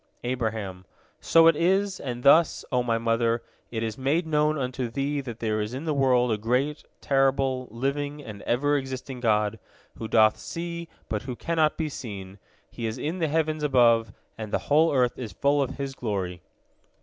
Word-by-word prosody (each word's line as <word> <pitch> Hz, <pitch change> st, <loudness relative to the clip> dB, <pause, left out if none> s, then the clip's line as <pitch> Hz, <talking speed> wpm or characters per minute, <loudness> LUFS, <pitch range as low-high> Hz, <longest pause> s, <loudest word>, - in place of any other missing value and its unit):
" -, -, -40 dB
Abraham: 110 Hz, -6 st, -4 dB, 0.3 s
"So 165 Hz, 0 st, +5 dB
it 165 Hz, -1 st, +6 dB
is, 190 Hz, +4 st, +1 dB
and 125 Hz, -2 st, -5 dB
thus, 155 Hz, +3 st, +5 dB
O 125 Hz, -1 st, +2 dB
my 115 Hz, -2 st, 0 dB
mother, 115 Hz, 0 st, +1 dB, 0.3 s
it 115 Hz, -1 st, -3 dB
is 110 Hz, +2 st, -4 dB
made 150 Hz, +6 st, +1 dB
known 150 Hz, 0 st, +1 dB
unto 125 Hz, -2 st, -2 dB
thee 140 Hz, +4 st, -1 dB
that 120 Hz, -4 st, -7 dB
there 110 Hz, -1 st, 0 dB
is 105 Hz, +4 st, -4 dB
in 135 Hz, -, -5 dB
the 155 Hz, -, 0 dB
world 125 Hz, -3 st, +3 dB
a 110 Hz, -, 0 dB
great, 130 Hz, +7 st, 0 dB, 0.2 s
terrible, 135 Hz, -2 st, +1 dB
living, 145 Hz, +5 st, -2 dB
and 105 Hz, -5 st, -9 dB
ever 145 Hz, +4 st, +2 dB
existing 130 Hz, -1 st, -5 dB
God, 105 Hz, -3 st, +1 dB, 0.4 s
who 110 Hz, -, -4 dB
doth 110 Hz, -1 st, +4 dB
see, 170 Hz, 0 st, -5 dB, 0.2 s
but 105 Hz, -2 st, -2 dB
who 125 Hz, -, -3 dB
cannot 160 Hz, +2 st, +1 dB
be 160 Hz, -, -1 dB
seen. 100 Hz, -9 st, -8 dB, 0.3 s
He 115 Hz, -, -4 dB
is 110 Hz, -, -4 dB
in 165 Hz, +5 st, -3 dB
the 160 Hz, -, +1 dB
heavens 155 Hz, 0 st, 0 dB
above, 120 Hz, -5 st, +4 dB, 0.3 s
and 110 Hz, -2 st, -5 dB
the -, -, +2 dB, 0.2 s
whole 160 Hz, +2 st, +5 dB
earth 125 Hz, -3 st, +1 dB
is 115 Hz, -6 st, -6 dB
full 140 Hz, +7 st, +2 dB
of 135 Hz, -1 st, -3 dB
His 140 Hz, -1 st, -4 dB
glory." 95 Hz, -8 st, -3 dB
130 Hz, 185 wpm, -26 LUFS, 115-145 Hz, 0.4 s, it